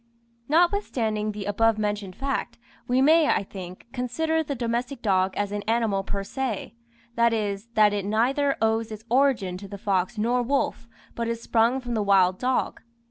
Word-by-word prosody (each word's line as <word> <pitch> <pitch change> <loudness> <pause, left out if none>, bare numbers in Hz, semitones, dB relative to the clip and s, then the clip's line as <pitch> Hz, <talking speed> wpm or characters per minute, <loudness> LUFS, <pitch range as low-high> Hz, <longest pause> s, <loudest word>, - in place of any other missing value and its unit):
Notwithstanding 265 - +1
the 205 -1 -6
above 220 +2 +2
mentioned 205 -3 -2
fact, 275 0 -3 0.3
we 255 +2 +3
may, 315 +2 +5
I 200 - +2
think, 185 -2 -9
consider 315 +6 0
the 290 -2 -4
domestic 240 +2 -3
dog 190 -2 +2
as 205 -1 -1
an 205 0 -3
animal 220 -4 +1
per 200 0 -3
se; 250 -1 -4 0.4
that 235 0 +3
is, 205 -1 -2
that 210 -1 +5
it 205 -1 -1
neither 260 +7 +1
owes 225 0 +1
its 215 0 -8
origin 245 -9 +2
to 200 +2 -9
the 200 - -8
fox 195 -1 -1
nor 240 +4 +1
wolf, 245 -2 -1 0.3
but 235 0 -3
is 230 0 -2
sprung 230 +2 +2
from 245 -2 -5
the 220 - 0
wild 190 -2 +3
dog. 255 0 -1
225 Hz, 175 wpm, -25 LUFS, 205-255 Hz, 0.4 s, may